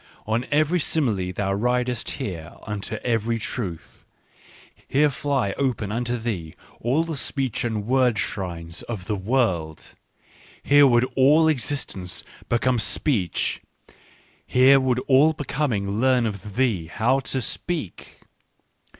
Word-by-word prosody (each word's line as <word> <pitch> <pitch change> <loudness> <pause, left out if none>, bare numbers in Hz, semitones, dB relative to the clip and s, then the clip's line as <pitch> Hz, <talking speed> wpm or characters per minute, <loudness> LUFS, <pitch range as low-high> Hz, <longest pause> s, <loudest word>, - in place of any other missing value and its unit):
On 115 +4 -1
every 155 +4 +2
simile 110 - 0
thou 95 +1 -1
ridest 125 +3 0
here 85 -4 -5
unto 105 -2 -4
every 115 -1 0
truth. 100 -7 -6 0.8
Here 145 +2 +3
fly 135 -8 -1
open 120 -7 -1
unto 120 +2 -1
thee 100 -9 -4 0.2
all 130 +8 +1
the 165 -1 -4
speech 135 -4 -1
and 110 -3 -2
word 125 -2 +2
shrines 85 -3 -4
of 105 -6 -5
the 105 - -1
world, 95 - -1 0.7
here 145 0 +6
would 120 -1 +4
all 150 +4 +5
existence 125 - -2 0.3
become 120 +1 +2
speech, 105 - 0 0.9
here 130 +2 +6
would 130 -2 +1
all 145 +4 +5
Becoming 120 -9 -2
learn 130 -1 +3
of 105 -1 -5
thee 115 -10 +1
how 115 +9 +1
to 135 0 -2
speak.") 140 - -4
120 Hz, 125 wpm, -24 LUFS, 100-135 Hz, 0.9 s, here